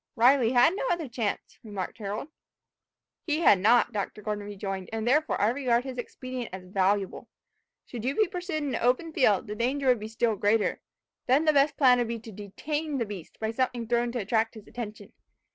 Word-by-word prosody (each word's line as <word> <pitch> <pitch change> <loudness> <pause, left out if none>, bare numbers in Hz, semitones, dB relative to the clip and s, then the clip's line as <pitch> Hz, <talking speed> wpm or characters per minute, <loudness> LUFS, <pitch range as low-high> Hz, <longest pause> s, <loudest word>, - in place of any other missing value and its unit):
"Riley 250 0 +4
had 250 +7 +5
no - - -2
other 340 -4 -1
chance," 230 -4 -4
remarked 205 -1 -6
Harold. 210 +7 -4 1.0
"He 305 +1 0
had 200 - +6
not," 235 +4 +4
Dr. 210 0 -4
Gordon 210 -1 -3
rejoined, 195 -2 -5
"and 225 0 -3
therefore 300 +5 +2
I 205 - +3
regard 245 -1 +1
his 255 -2 -6
expedient 255 0 -6
as 185 0 -8
valuable. 195 +1 0 0.6
Should 235 -3 -7
you 265 +3 -1
be 430 - +3
pursued 355 -4 -4
in 280 -3 -2
an - - -2
open 255 +7 +1
field, 210 -9 +3
the 210 - -5
danger 260 +6 -1
would 245 -3 +4
be 215 - -6
still 225 0 0
greater. 205 +2 +1 0.5
Then 275 +5 +3
the 310 - +4
best 280 +1 +3
plan 250 -3 +5
would 240 - 0
be 235 0 -3
to 225 0 -11
detain 285 +10 -4
the 235 - 0
beast 200 -5 -9
by 220 0 -1
something 240 -1 -1
thrown 240 0 +1
to 245 - -2
attract 225 +2 0
his 215 - -12
attention. 210 -4 -8
235 Hz, 200 wpm, -27 LUFS, 210-265 Hz, 1.0 s, had